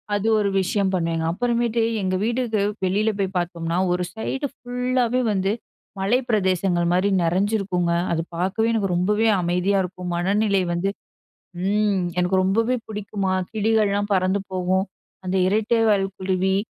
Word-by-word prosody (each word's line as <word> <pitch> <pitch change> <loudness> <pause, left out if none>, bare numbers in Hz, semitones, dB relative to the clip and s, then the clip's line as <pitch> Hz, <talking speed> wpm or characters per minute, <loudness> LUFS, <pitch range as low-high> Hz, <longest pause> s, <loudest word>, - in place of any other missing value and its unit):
அது 205 +2 -1
ஒரு 200 -1 +1
விஷயம் 190 +1 0
பண்ணுவேங்க. 165 -2 0
அப்புறமேட்டு 235 +2 0 0.2
எங்க 185 -1 0
வீட்டுக்கு 235 -2 0 0.2
வெளில 205 +4 +1
போய் 195 -1 -2
பார்த்தோம்ன்னா, 170 -1 -2 0.2
ஒரு 180 0 -1
சைடு 270 +6 -3
ஃபுல்லாவே 250 0 -1
வந்து 195 -1 0 0.5
மலை 200 +6 +2
பிரதேசங்கள் 185 -4 +1
மாரி 190 +3 +2
நிறைஞ்சிருக்குங்க. 185 0 0 0.2
அது 165 - +1
பார்க்கவே 190 +6 0
எனக்கு 205 -4 0
ரொம்பவே 210 +5 +2
அமைதியா 180 +3 +1
இருக்கும். 180 -1 -6
மனநிலை 195 +2 +1
வந்து 175 +3 0 0.8
ம், 205 -1 +2 0.2
எனக்கு 180 +1 +2
ரொம்பவே 225 +6 +1
பிடிக்குமா! 205 -2 -3 0.2
கிளிகள்லாம் 210 -2 +1
பறந்து 190 +1 +2
போகும், 185 0 +1 0.4
அந்த 185 +1 -1
இரட்டைவால் 215 0 +2
குருவி 190 0 0
195 Hz, 130 wpm, -23 LUFS, 185-220 Hz, 0.8 s, மலை